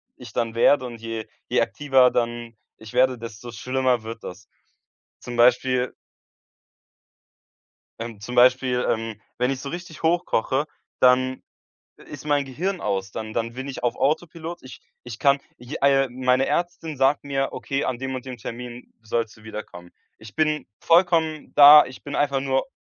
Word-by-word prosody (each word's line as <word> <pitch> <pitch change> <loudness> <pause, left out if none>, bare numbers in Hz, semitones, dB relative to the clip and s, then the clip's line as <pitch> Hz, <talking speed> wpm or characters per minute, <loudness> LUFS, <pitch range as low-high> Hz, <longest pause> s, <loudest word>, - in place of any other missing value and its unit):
ich - - -12
dann 115 -1 -2
werde 130 +3 +4
und 120 -2 -8
je 115 -1 -5 0.2
je - - +2
aktiver 135 -3 +3
dann 120 -1 -2 0.2
ich 110 +1 -12
werde, 130 0 +3
desto 115 0 -9
schlimmer 125 +1 0
wird 115 +1 -8
das. 100 +4 -9 0.7
Zum 120 - -7
Beispiel 125 +1 +3 2.1
ähm, 115 -2 -7
zum 125 +4 -6
Beispiel, 125 0 +4
ähm, 110 -1 -3 0.2
wenn 125 +2 +1
ich 135 - -3
so 140 - -6
richtig 170 -1 -8
hochkoche, 160 -5 +1 0.4
dann 130 0 +3 0.6
i - - -16
ist 145 -1 -10
mein 145 -1 +2
Gehirn 175 +9 -3
aus. 95 -2 -2
Dann 110 0 -6
dann 115 +1 -2
bin 130 +2 -6
ich 130 - -7
auf 120 -1 0
Autopilot. 165 +3 -2
Ich 130 - -12 0.2
ich 120 -2 -8
kann, 140 0 +4 0.2
j 125 +4 -7
äh, 135 -1 +4
meine 130 +1 +1
Ärztin 170 -3 -2
sagt 135 +2 +2
mir: 135 -1 -1
„Okay, 135 +1 -3
an 125 -2 -2
dem 130 +1 -4
und 130 0 -5
dem 130 -1 -6
Termin 120 +2 -8
sollst 110 0 -2
du 110 - -19
wiederkommen.“ 105 -5 -9 0.3
Ich 110 -1 -13
bin 155 -1 0
vollkommen 165 -2 +2
da. 145 +1 +10
Ich 130 - -12
bin 145 - -6
einfach 140 -2 +1
nur 135 -1 0
130 Hz, 165 wpm, -23 LUFS, 115-140 Hz, 2.1 s, da